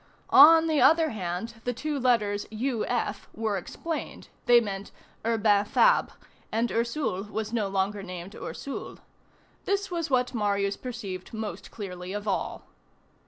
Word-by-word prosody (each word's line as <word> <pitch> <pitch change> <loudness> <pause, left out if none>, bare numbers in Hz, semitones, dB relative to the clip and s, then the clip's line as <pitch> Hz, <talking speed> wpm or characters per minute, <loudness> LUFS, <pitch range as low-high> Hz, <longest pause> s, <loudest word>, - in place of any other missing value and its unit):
On 320 +3 +9
the 315 -2 +2
other 320 -1 +5
hand, 215 +4 -5
the 245 -1 -2
two 295 +2 -2
letters 215 -5 +1
U. 230 +1 -2
F. 220 -4 -2
were 220 -2 -1
explained; 315 - -5 0.2
they 240 0 +8
meant 200 -3 -5 0.3
Urbain 215 -3 +3
Fabre; - - +3 0.4
and 230 +2 0
Ursule 235 -4 -1
was 220 +1 -4
no 220 -4 +1
longer 195 +1 -1
named 185 0 -8
Ursule. 280 - -6 0.7
This 400 -1 -1
was 335 -3 -2
what 250 -1 +1
Marius 200 -3 0
perceived 220 -6 -7
most 220 -1 -5
clearly 180 -3 -7
of 205 +1 -5
all. 195 - -2
220 Hz, 140 wpm, -27 LUFS, 200-255 Hz, 0.7 s, On